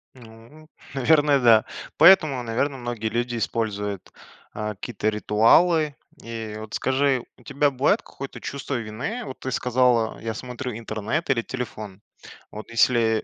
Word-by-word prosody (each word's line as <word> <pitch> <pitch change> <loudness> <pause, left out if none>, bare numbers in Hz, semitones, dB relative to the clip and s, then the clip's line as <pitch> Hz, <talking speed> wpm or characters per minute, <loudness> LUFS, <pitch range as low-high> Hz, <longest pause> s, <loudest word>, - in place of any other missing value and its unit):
Ну, 120 +6 -16 0.3
наверное, 145 +1 +4
да. 115 -3 +5 0.3
Поэтому, 155 -9 +6
наверно, 130 +5 -1
многие 120 -3 -4
люди 120 +1 -2
используют, 105 -3 -3 0.4
э, 105 0 -3
какие-то 110 +1 -2
ритуалы. 145 +9 +3 0.3
И 115 -2 -6
вот 110 0 -9
скажи, 130 -1 +1
у 125 - -20
тебя 140 +2 +1
бывает 135 0 +1
какое-то 135 0 -9
чувство 140 0 -4
вины? 120 - -4
Вот 130 - -8
ты 130 - -5
сказала 125 -2 +1
я 115 0 -4
смотрю 125 +1 -6
интернет 110 +7 -3
или 130 -4 +2
телефон. 105 -6 -7 0.5
Вот 110 +1 -9
если 115 -1 +2
120 Hz, 135 wpm, -24 LUFS, 110-135 Hz, 0.5 s, Поэтому